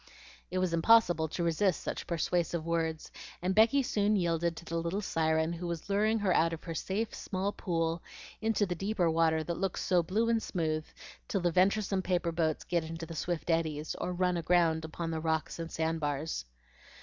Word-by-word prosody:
It 185 - -3
was 185 -2 +1
impossible 175 -2 +4
to 170 +3 -3
resist 170 +1 +1
such - - -4
persuasive 170 -1 0
words, 165 -1 -1 0.3
and 185 +2 0
Becky 230 +7 +5
soon 210 -3 +1
yielded 170 -2 0
to 170 - -9
the 165 +1 -3
little 170 +4 -2
siren 160 -1 +1
who 175 +1 -5
was 170 +3 -4
luring 215 +3 +3
her 200 -4 +2
out 165 +1 +3
of 165 - -7
her 165 - -5
safe, 205 +7 -2
small 195 +1 -2
pool 165 -4 -1 0.4
into 220 -1 +2
the 180 - -2
deeper 185 -1 0
water 160 -1 +2
that 170 +1 -4
looks 195 -1 -1
so 180 -2 +3
blue 210 +7 0
and 230 -1 +2
smooth 155 -5 -2 0.4
till 195 - -1
the 175 0 +2
venturesome 195 +2 +2
paper 180 -2 0
boats 160 -2 0
get 170 -2 0
into 165 +1 -6
the 165 - -8
swift 170 +1 -2
eddies, 160 -2 -1
or - - -1
run 180 0 +1
aground 165 -1 +2
upon 165 +1 -4
the 160 - -2
rocks 160 0 -1
and 165 0 -5
sandbars. 160 - -2
170 Hz, 190 wpm, -31 LUFS, 160-190 Hz, 0.4 s, Becky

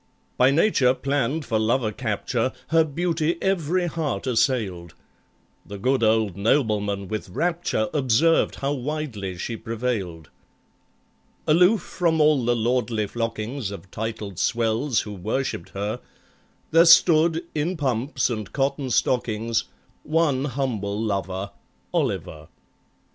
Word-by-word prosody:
By 125 +1 +5
Nature 140 -5 +3
planned 140 +2 -1
for 110 - 0
lover 110 0 +1
capture, 115 +2 -2 0.2
Her 165 0 +5
beauty 165 +1 -1
every 180 -2 0
heart 155 - -3
assailed; 110 - 0 0.7
The 100 - -8
good 130 +6 +1
old 110 -3 +2
nobleman 105 -3 0
with 110 -2 -5
rapture 170 - -1
Observed 145 +4 +3
how 140 +1 -2
widely 130 - -4
she 115 +6 -4
prevailed 110 - -4 1.1
Aloof 180 +5 +4
from 165 -3 0
all 150 -4 +4
the 120 +1 +2
lordly 115 -2 0
flockings 115 +2 -3
Of 100 -2 -10
titled 110 -4 -5
swells 115 +2 +1
who 105 - -7
worshipped 100 -1 -3
her, 100 +2 -3 0.7
There 165 +1 +6
stood, 165 -1 +5
in 160 +4 -1
pumps 130 -1 0
and 110 -4 -4
cotton 135 0 -1
stockings, 115 -2 0 0.4
One 150 -4 +1
humble 120 -7 -2
lover—OLIVER. 95 -6 -4
120 Hz, 115 wpm, -24 LUFS, 105-150 Hz, 1.1 s, There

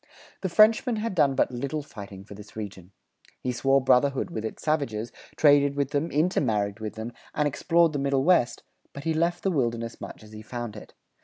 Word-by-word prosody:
The 190 - -1
Frenchman 220 +5 +4
had 220 0 -2
done 145 -6 +3
but - - +2
little 140 +4 -3
fighting 100 -6 -10
for 100 - -12
this 105 +1 -13
region. 100 -4 -7 0.5
He 125 - -2
swore 135 +3 +3
brotherhood 135 +1 +2
with 110 - -4
its 110 - -6
savages, 120 -8 -1 0.2
traded 145 -2 +5
with 140 -1 -1
them, 145 +4 0
intermarried 115 - 0
with 110 -1 -5
them, 110 +2 -6 0.2
and 150 - +2
explored 165 +3 +2
the 145 - -1
Middle 135 -1 +1
West; 170 -8 +3 0.3
but 140 - -8
he 165 0 0
left 170 +2 0
the 195 - +1
wilderness 115 -6 -2
much - - -8
as 105 - -14
he 110 0 -9
found 120 -1 -6
it. 105 - -12
135 Hz, 200 wpm, -26 LUFS, 110-155 Hz, 0.5 s, traded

